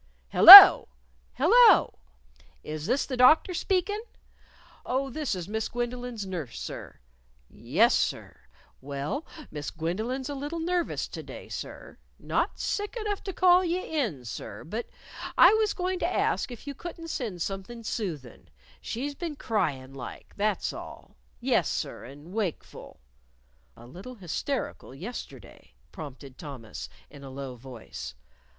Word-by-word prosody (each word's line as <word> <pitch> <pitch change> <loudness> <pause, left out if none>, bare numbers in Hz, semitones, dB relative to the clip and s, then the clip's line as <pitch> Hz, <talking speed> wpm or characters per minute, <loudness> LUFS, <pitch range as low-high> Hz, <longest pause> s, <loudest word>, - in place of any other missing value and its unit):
"Hello!... - - +12 0.5
Hello! 455 - +5 0.6
Is 155 +1 -6
this 255 +5 0
the 260 - -5
Doctor 310 +8 +4
speakin'?... 390 +4 -1 0.8
Oh, 265 +1 -2
this 295 -5 -3
is 180 -2 -7
Miss 220 +1 -3
Gwendolyn's 240 -2 -5
nurse, 170 -10 -6
sir.... - - -9 0.5
Yes - - +1
sir. - - -2 0.4
Well, 140 - -5 0.2
Miss 150 -1 -6
Gwendolyn's 220 +11 -4
a 290 - -5
little 290 +4 -5
nervous 345 +1 -2
to - - -8
day, - - -11
sir. - - -9 0.2
Not - - -2
sick 415 +3 -3
enough 420 -2 -3
to 390 - -3
call 365 0 +4
you 350 0 -1
in, 220 - -3
sir.... 105 - -8
But 220 +9 -6 0.5
I - - +7
was 435 -1 0
goin' 365 0 -3
to - - -1
ask - - -1
if 240 -3 -11
you 285 - -6
couldn't 330 +3 -9
send 205 - -4
something 200 +4 -7
soothin'. 165 - -6 0.3
She's 275 +5 -5
been 325 +1 -6
cryin' 140 - -3
like, 135 - -10
that's 205 -1 -1
all.... - - -11 0.2
Yes, - - 0
sir, - - -5
and 145 +7 -13
wakeful 205 -7 -6 0.4
" - - -37
"A 120 - -14
little 185 - -11
hysterical 195 - -5
yesterday," 205 - -10 0.2
prompted 140 -3 -11
Thomas, 130 -8 -9 0.2
in 145 -1 -13
a 135 - -9
low 135 -1 -7
voice. 115 - -10
220 Hz, 140 wpm, -27 LUFS, -, 0.8 s, Hello